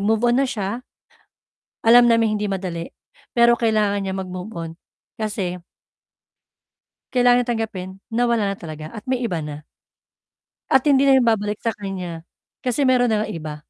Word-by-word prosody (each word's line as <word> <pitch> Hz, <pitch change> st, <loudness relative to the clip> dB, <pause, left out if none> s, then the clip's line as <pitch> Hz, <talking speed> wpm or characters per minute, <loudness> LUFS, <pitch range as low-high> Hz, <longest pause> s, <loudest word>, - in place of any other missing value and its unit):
move-on 225 Hz, +4 st, +2 dB
na -, -, +1 dB
siya, 210 Hz, +1 st, -3 dB, 1.1 s
alam 240 Hz, +1 st, +8 dB
naming 225 Hz, -2 st, +3 dB
hindi 210 Hz, -, -1 dB
madali, 175 Hz, -3 st, -4 dB, 0.5 s
pero 235 Hz, 0 st, +6 dB
kailangan 215 Hz, -3 st, +2 dB
niyang 190 Hz, 0 st, -3 dB
mag-move-on 180 Hz, -2 st, -6 dB, 0.5 s
kasi 195 Hz, -5 st, -3 dB, 1.5 s
Kailangan 245 Hz, -1 st, +4 dB
tanggapin 220 Hz, -6 st, -3 dB, 0.2 s
na 240 Hz, +2 st, +1 dB
wala 225 Hz, -4 st, +1 dB
na 195 Hz, -, -4 dB
talaga 155 Hz, -2 st, -8 dB
at 215 Hz, +1 st, -10 dB
may 255 Hz, -1 st, -1 dB
iba 180 Hz, -8 st, -1 dB
na. 150 Hz, 0 st, -7 dB, 1.1 s
At 265 Hz, -, +5 dB
hindi 275 Hz, -1 st, +5 dB
na 270 Hz, -, +6 dB
yun 240 Hz, -, +2 dB
babalik 210 Hz, -2 st, 0 dB
sa 230 Hz, -, +1 dB
kanya 180 Hz, -4 st, -6 dB, 0.4 s
kasi 255 Hz, +3 st, 0 dB
meron 255 Hz, -2 st, +4 dB
na 215 Hz, -2 st, +1 dB
ngang -, -, -4 dB
iba 155 Hz, -1 st, -6 dB
215 Hz, 150 wpm, -22 LUFS, 185-240 Hz, 1.5 s, alam